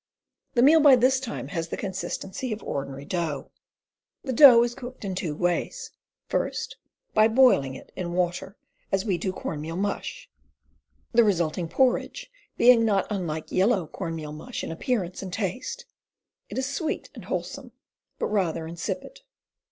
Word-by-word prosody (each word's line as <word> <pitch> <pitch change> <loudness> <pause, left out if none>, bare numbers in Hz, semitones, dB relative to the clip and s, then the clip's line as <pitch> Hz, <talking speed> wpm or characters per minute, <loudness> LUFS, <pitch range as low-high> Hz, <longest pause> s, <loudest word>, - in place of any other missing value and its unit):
The 240 - +5
meal 315 +4 +7
by 290 -3 +8
this 255 +2 +3
time 255 -3 -5
has 165 -3 -3
the - - -5
consistency 195 +4 -4
of 215 0 -4
ordinary 140 0 -5
dough. 165 -5 -3 0.7
The 260 - -2
dough 245 -3 +9
is 240 0 -1
cooked 255 -3 -9
in 190 - -2
two 170 -4 -3
ways: 175 +2 -1 0.4
first, - - -2 0.4
by 215 0 +6
boiling 225 - +4
it - - -12
in 175 -2 -4
water 180 +3 -2 0.3
as 195 +1 +1
we 190 -5 0
do 190 - -1
corn 155 -4 -5
meal 165 +2 -5
mush, 200 +2 -3 0.8
the 235 0 +5
resulting 175 -4 0
porridge 265 - 0 0.3
being 240 -1 +6
not 200 -4 +2
unlike 165 -6 -3
yellow 190 -1 +2
corn 165 +1 -5
meal 150 -2 -6
mush 230 +11 -6
in - - -4
appearance 185 0 -2
and 190 -2 -6
taste; 195 +4 -4 0.6
it - - -6
is 260 - 0
sweet 285 +3 -3
and - - -10
wholesome, - - -4 0.5
but - - -1
rather 175 -6 0
insipid. 170 - -5
195 Hz, 160 wpm, -26 LUFS, 170-245 Hz, 0.8 s, dough